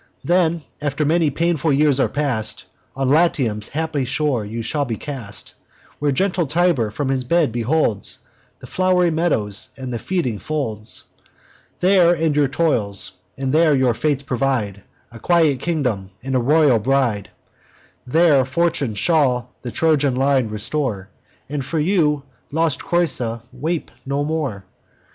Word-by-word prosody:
Then, 170 Hz, -2 st, +2 dB, 0.2 s
after 145 Hz, +1 st, -1 dB
many 160 Hz, +1 st, +3 dB
painful 165 Hz, 0 st, 0 dB
years 140 Hz, -1 st, +3 dB
are -, -, +2 dB
past, 125 Hz, -8 st, -2 dB, 0.3 s
On 135 Hz, 0 st, -1 dB
Latium's 130 Hz, -8 st, +2 dB
happy 160 Hz, -2 st, -2 dB
shore 130 Hz, -2 st, 0 dB
you 115 Hz, +3 st, -5 dB
shall 145 Hz, +6 st, -1 dB
be 120 Hz, -5 st, -3 dB
cast, 115 Hz, -6 st, -7 dB, 0.5 s
Where 145 Hz, -1 st, +1 dB
gentle 180 Hz, +3 st, 0 dB
Tiber 160 Hz, -7 st, +2 dB
from 135 Hz, +6 st, -3 dB
his 135 Hz, -1 st, 0 dB
bed 160 Hz, +1 st, +2 dB
beholds 120 Hz, -2 st, 0 dB, 0.4 s
The -, -, -9 dB
flow'ry 180 Hz, +3 st, +2 dB
meadows, 130 Hz, -, 0 dB
and 130 Hz, -2 st, -5 dB
the 120 Hz, -, -3 dB
feeding 140 Hz, -, -2 dB
folds. 115 Hz, -9 st, -4 dB, 0.8 s
There 180 Hz, -2 st, +5 dB
end 160 Hz, -2 st, 0 dB
your 145 Hz, -1 st, +3 dB
toils; 115 Hz, -, 0 dB, 0.3 s
and 135 Hz, 0 st, -2 dB
there 155 Hz, -2 st, +4 dB
your 130 Hz, -3 st, +3 dB
fates 140 Hz, +3 st, -1 dB
provide 125 Hz, -7 st, -1 dB, 0.3 s
A 115 Hz, -, -11 dB
quiet 160 Hz, -3 st, +3 dB
kingdom, 125 Hz, -, -1 dB
and 135 Hz, 0 st, -3 dB
a 130 Hz, -, +3 dB
royal 140 Hz, -1 st, +4 dB
bride: 120 Hz, -5 st, 0 dB, 0.8 s
There 155 Hz, -1 st, +4 dB
fortune 140 Hz, -4 st, 0 dB
shall 125 Hz, -, +1 dB
the 125 Hz, -, -5 dB
Trojan 145 Hz, -2 st, +2 dB
line 135 Hz, -2 st, +2 dB
restore, 110 Hz, -2 st, -3 dB, 0.4 s
And 145 Hz, +1 st, -3 dB
you 155 Hz, -3 st, +2 dB
for 130 Hz, +1 st, -16 dB
lost 160 Hz, -3 st, +1 dB
Creusa 125 Hz, -10 st, 0 dB
weep 155 Hz, +6 st, -3 dB, 0.2 s
no 140 Hz, +1 st, 0 dB
more. 145 Hz, -11 st, -3 dB
140 Hz, 145 wpm, -20 LUFS, 120-160 Hz, 0.8 s, There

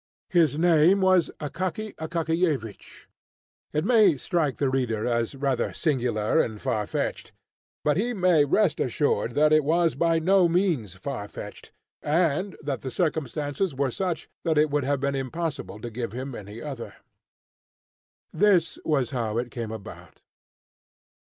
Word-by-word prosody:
His 165 Hz, -5 st, +3 dB
name 170 Hz, +3 st, +5 dB
was 185 Hz, -3 st, +4 dB
Akaky 185 Hz, +8 st, -4 dB
Akakiyevich. 160 Hz, -, -2 dB, 0.7 s
It 150 Hz, +3 st, -1 dB
may 210 Hz, -, +5 dB
strike 155 Hz, -2 st, -1 dB
the 140 Hz, -, +1 dB
reader 120 Hz, -5 st, -1 dB
as 120 Hz, +1 st, 0 dB
rather 135 Hz, -3 st, -1 dB
singular 120 Hz, -8 st, 0 dB
and 110 Hz, -2 st, -4 dB
far 105 Hz, -1 st, -1 dB
fetched; -, -, -3 dB, 0.5 s
but 150 Hz, 0 st, +2 dB
he 235 Hz, +5 st, 0 dB
may 180 Hz, -8 st, +3 dB
rest 170 Hz, +5 st, +2 dB
assured 120 Hz, -3 st, 0 dB
that 150 Hz, +3 st, +4 dB
it 155 Hz, 0 st, +5 dB
was 165 Hz, +3 st, +2 dB
by 165 Hz, -1 st, +2 dB
no 180 Hz, +2 st, +4 dB
means 165 Hz, -, 0 dB
far 105 Hz, 0 st, -5 dB
fetched, -, -, -10 dB, 0.3 s
and 170 Hz, +4 st, +1 dB
that 140 Hz, -3 st, -3 dB
the 130 Hz, -, -4 dB
circumstances 150 Hz, +1 st, -1 dB
were 135 Hz, -1 st, 0 dB
such 180 Hz, +3 st, -3 dB, 0.2 s
that 160 Hz, -2 st, +1 dB
it 150 Hz, 0 st, +3 dB
would 145 Hz, -2 st, 0 dB
have 140 Hz, 0 st, 0 dB
been 140 Hz, +1 st, -1 dB
impossible 140 Hz, -3 st, -4 dB
to 120 Hz, +2 st, -7 dB
give 115 Hz, -1 st, -4 dB
him 130 Hz, +2 st, -5 dB
any 105 Hz, +1 st, -8 dB
other. 135 Hz, -6 st, -7 dB, 1.4 s
This 185 Hz, -5 st, +3 dB
was 140 Hz, -5 st, 0 dB
how 115 Hz, -4 st, -2 dB
it 120 Hz, 0 st, -2 dB
came 115 Hz, -4 st, -5 dB
about. 110 Hz, -3 st, -10 dB
145 Hz, 145 wpm, -26 LUFS, 125-170 Hz, 1.4 s, name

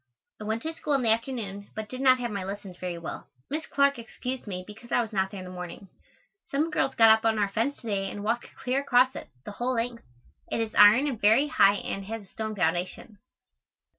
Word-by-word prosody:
I 215 Hz, -, -7 dB
went 220 Hz, +2 st, -2 dB
to 320 Hz, -, -3 dB
school 300 Hz, -2 st, -2 dB
in 270 Hz, -2 st, +2 dB
the 225 Hz, -, +5 dB
afternoon, 220 Hz, -4 st, -2 dB
but 220 Hz, -1 st, -4 dB
did 255 Hz, +4 st, -6 dB
not 260 Hz, -1 st, +6 dB
have 240 Hz, -2 st, -3 dB
my 200 Hz, -2 st, -3 dB
lessons 195 Hz, -1 st, -7 dB
very 180 Hz, -2 st, -4 dB
well. 170 Hz, -, -7 dB, 0.2 s
Miss 315 Hz, +2 st, -2 dB
Clark 280 Hz, -2 st, +2 dB
excused 250 Hz, +2 st, -5 dB
me 185 Hz, -2 st, -4 dB
because 220 Hz, +4 st, -13 dB
I -, -, +3 dB
was 225 Hz, -2 st, -2 dB
not 190 Hz, -1 st, +1 dB
there 200 Hz, -, -8 dB
in 185 Hz, -, -6 dB
the 180 Hz, -, -8 dB
morning. 180 Hz, +1 st, -8 dB, 0.6 s
Some 305 Hz, +4 st, 0 dB
girls 270 Hz, -3 st, 0 dB
got 225 Hz, -1 st, +8 dB
up 220 Hz, 0 st, +4 dB
on 225 Hz, -1 st, +2 dB
our 205 Hz, -1 st, +1 dB
fence 230 Hz, +8 st, -1 dB
to 235 Hz, -, -9 dB
day 195 Hz, -2 st, -1 dB
and 205 Hz, -, -7 dB
walked 230 Hz, +3 st, -1 dB
clear 265 Hz, 0 st, -1 dB
across 260 Hz, -1 st, +3 dB
it, -, -, -8 dB, 0.2 s
the -, -, -6 dB
whole 245 Hz, +5 st, -1 dB
length. 235 Hz, 0 st, -2 dB, 0.5 s
It -, -, 0 dB
is 225 Hz, -1 st, -2 dB
iron 210 Hz, +7 st, +7 dB
and 260 Hz, -7 st, -3 dB
very 230 Hz, +8 st, +5 dB
high 205 Hz, -10 st, +5 dB
and 195 Hz, -1 st, -4 dB
has 225 Hz, +1 st, -5 dB
a -, -, -17 dB
stone 220 Hz, +2 st, -5 dB
foundation. 180 Hz, +3 st, -2 dB
220 Hz, 235 wpm, -27 LUFS, 200-255 Hz, 0.6 s, got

